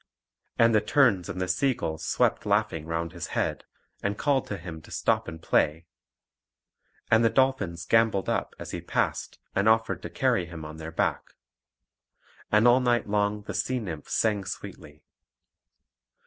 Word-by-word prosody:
And 115 0 +5
the 110 - +4
terns 115 - +3
and 90 - -4
the 90 - -1
sea 125 +9 +1
gulls 80 -3 -4
swept - - +1
laughing 80 -1 0
round 85 0 -2
his - - -6
head, - - -1 0.4
and 100 0 -2
called 140 0 +1
to 100 - -4
him 85 -2 -8
to - - -16
stop - - 0
and 80 - -7
play, 80 0 +1 1.3
and 110 +1 +5
the 115 - +5
dolphins 110 -9 +1
gambolled 110 -2 +2
up - - -1
as - - -8
he - - -5
passed, - - -2 0.2
and 100 +3 +3
offered 110 0 +2
to - - -6
carry 90 -2 +1
him 80 -2 -8
on 75 +1 -8
their 80 0 -7
back. - - -2 1.2
And 105 +3 +5
all 120 +1 +6
night 120 -3 +1
long 105 0 0
the 105 - -6
sea 95 +9 -1
nymphs 85 -9 -5
sang 105 -3 +1
sweetly. 75 -4 -8
100 Hz, 165 wpm, -27 LUFS, 85-115 Hz, 1.3 s, all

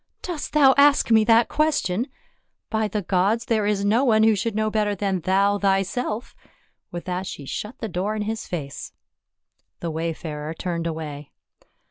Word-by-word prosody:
" - - -52
Dost 345 -5 -5
thou 280 -3 +6
ask 285 -4 +5
me 220 -1 +6
that 230 +1 +5
question? 275 -8 0 0.6
By 220 -1 +1
the 210 -1 -3
gods, 195 +5 +1
there 215 -3 +1
is 200 -1 0
no 225 +6 +3
one 220 -4 +4
who 220 -1 +5
should 205 +2 -2
know 215 0 0
better 210 -1 0
than 195 -1 -1
thou 195 +3 +2
thyself." 200 +4 -1 0.6
With 175 0 -6
that 180 +1 -3
she 140 - -7
shut 210 - -5
the 225 - -4
door 200 +3 -2
in 210 - -2
his 220 +1 -4
face. 145 -6 -6 0.9
The 170 - -3
wayfarer 160 -1 -4
turned 170 -1 -3
away. 150 -3 -6
205 Hz, 170 wpm, -23 LUFS, 180-225 Hz, 0.9 s, thou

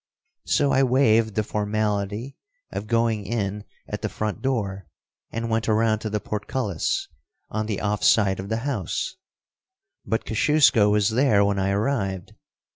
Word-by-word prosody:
So 140 -1 +2
I 135 - +4
waived 115 -5 +3
the 110 - +1
formality 105 +3 -2 0.4
of 105 - -5
going 115 -2 +1
in 105 -2 -3 0.2
at - - -5
the - - -2
front 110 -1 -3
door, 100 - -2 0.4
and 115 +1 -3
went 115 -1 0
around 110 0 +2
to 110 - -4
the 105 0 -1
portcullis, 105 - -2 0.4
on 110 0 -2
the 105 -3 -2
off 105 0 -1
side 95 -3 +4
of 95 +1 -6
the 115 +3 -2
house, 140 - -2 0.9
but 110 - -2
Kosciusko 125 -3 +4
was 105 0 +3
there 110 -4 +3
when 100 -1 0
I 95 0 +1
arrived. 100 -3 -1
110 Hz, 150 wpm, -24 LUFS, 100-115 Hz, 0.9 s, I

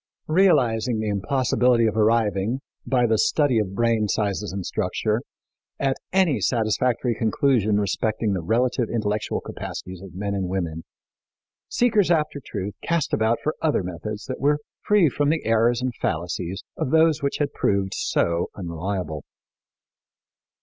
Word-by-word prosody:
Realizing 125 - +3
the 110 -1 -1
impossibility 125 +2 +2
of 110 - 0
arriving, 110 +1 +2 0.3
by 125 -2 +3
the 110 -2 +2
study 145 -7 +3
of 100 -2 -2
brain 115 -1 +2
sizes 105 0 -1
and 95 -1 -5
structure, 110 +2 -1 0.6
at 135 -1 +1 0.2
any 175 - +2
satisfactory 120 +2 +1
conclusion 110 -2 +2
respecting 105 +2 0
the 90 - -1
relative 120 +5 +1
intellectual 105 -2 -1
capacities 90 -1 -7
of 95 -3 -11
men 100 +1 -3
and 95 -2 -1
women, 85 -4 -3 0.8
seekers 220 -6 +2
after 150 -4 +1
truth 100 0 -5
cast 170 -3 -1
about 110 +1 +2
for 155 - 0
other 150 -11 +1
methods 105 +5 -6
that 130 - -5
were 145 +1 +3 0.2
free 210 -5 +4
from 145 +1 0
the 160 +1 0
errors 115 +2 +2
and 130 -1 -1
fallacies 90 +3 -2
of - - -1
those 160 0 +4
which 140 0 -1
had 145 -2 -1
proved 100 -1 0
so 85 0 0
unreliable. 85 -3 -4
110 Hz, 145 wpm, -24 LUFS, 100-130 Hz, 0.8 s, free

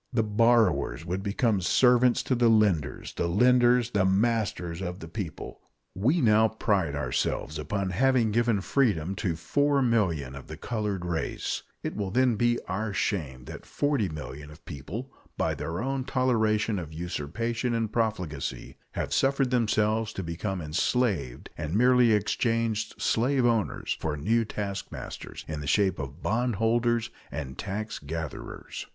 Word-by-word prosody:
The 120 -3 +2
borrowers 110 - +2
would 90 +2 -2
become 100 0 +1
servants 125 +5 +4
to - - 0
the 120 -1 +4
lenders, 100 -10 +1
the 85 - -1
lenders 120 +4 +4
the 100 -2 +2
masters 95 -4 0
of 90 -1 -4
the 80 - -8
people. 85 -2 -6 0.3
We 130 - +2
now 110 -1 +5
pride 100 -9 0
ourselves 75 +3 -2
upon 95 +5 -2
having 120 +2 +3
given 115 -2 +2
freedom 95 - +1
to 90 -2 -1
4,000,000 110 - +1
of 70 - -10
the 80 0 -8
colored 105 -2 -3
race; 85 -2 -2 0.2
it - - -3
will 100 -2 -2
then 125 +3 +3
be 120 +2 +2
our 105 +2 -2
shame 65 -11 -2
that - - -8
40,000,000 75 - -2
of 75 - -15
people, 100 - -7 0.2
by - - +1
their 85 +4 -4
own 135 0 -1
toleration 110 -5 +1
of 80 -3 -7
usurpation 115 - -2
and 110 -2 -1
profligacy, 95 -11 -2 0.2
have - - -3
suffered 135 -1 +2
themselves 110 -2 +1
to 95 - -4
become 90 +3 -3
enslaved, 80 - -1
and 75 +3 -4
merely 125 0 +5
exchanged 110 +1 0
slave 130 +2 +2
owners 115 -3 0
for 75 -2 -2
new 115 +10 +1
taskmasters 100 -2 -6
in 80 -1 -4
the 70 - -6
shape 95 +3 +2
of 70 +3 -7
bondholders 120 +1 +1 0.2
and 65 -2 -6
taxgatherers. 85 -8 -5
105 Hz, 140 wpm, -27 LUFS, 85-120 Hz, 0.3 s, now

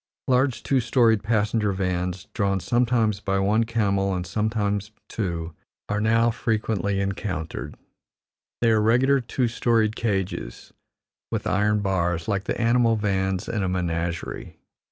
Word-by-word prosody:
Large, 130 0 +2
two 135 - +2
storied 115 -2 +3
passenger 105 -1 +1
vans, 90 0 -2
drawn 100 -3 0
sometimes 115 -2 +1
by 95 -1 -1
one 105 +4 +2
camel 100 -4 0
and 90 -1 -3
sometimes 105 +1 -1 0.2
two, 85 -6 -3 0.3
are 105 0 -1
now 115 +2 +3
frequently 110 -4 -1
encountered; 95 -4 -4 0.9
they 115 -1 +4
are 110 -1 +3
regular 130 +5 +3
two 120 +1 -1
storied 115 -2 +1
cages, 95 - -3 0.6
with - - -2
iron 105 +1 +2
bars, 90 -4 0
like 100 -1 -1
the - - -2
animal 115 0 +3
vans 95 -3 -1
in 110 -3 -2
a 95 - 0
menagerie. 85 -2 -3
105 Hz, 135 wpm, -24 LUFS, 95-115 Hz, 0.9 s, they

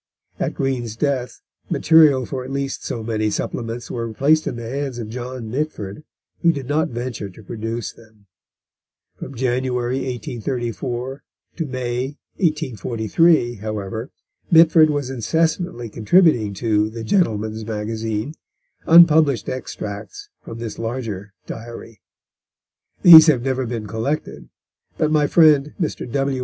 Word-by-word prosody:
At - - -2
Green's 125 -5 -2
death 130 -1 -2 0.3
material 150 -5 +5
for 130 0 -5
at 130 - -8
least 140 0 -3
so 115 - -4
many 110 -1 -1
supplements 115 +2 -4
were 115 -1 -4
placed 155 +7 +2
in 130 - -3
the 120 -1 -6
hands 135 0 -4
of 115 -3 -6
John 125 -1 -6
Mitford, 130 -5 -4 0.4
who 170 - +5
did 140 -5 -6
not 150 +3 0
venture 120 -4 -5
to 95 +4 -15
produce 115 +2 -5
them. 110 -2 -21 0.9
From 135 - -8
January 125 0 -1
1834 125 +1 -4 0.4
to 165 - -2
May 125 -1 -2 0.3
1843, 125 - +1
however, 110 +3 -5 0.4
Mitford 160 -1 +6
was 145 -3 -2
incessantly 160 - -1
contributing 115 - +3
to 105 0 +1
The 115 +1 -7
Gentleman's 110 - 0
Magazine 110 +3 -3 0.5
unpublished 160 -5 +6
extracts 130 - -7
from 115 - -8
this 115 -2 -6
larger 115 -4 -5
Diary. 115 -2 -9 1.0
These 160 -2 +11
have 130 -6 +3
never 130 -1 -1
been 115 -2 -4
collected, 115 +8 -4 0.5
but 155 - +1
my 150 -2 +3
friend, 150 -3 +4
Mr. 155 -7 -3
W. 135 0 0
125 Hz, 125 wpm, -21 LUFS, 110-145 Hz, 1.0 s, These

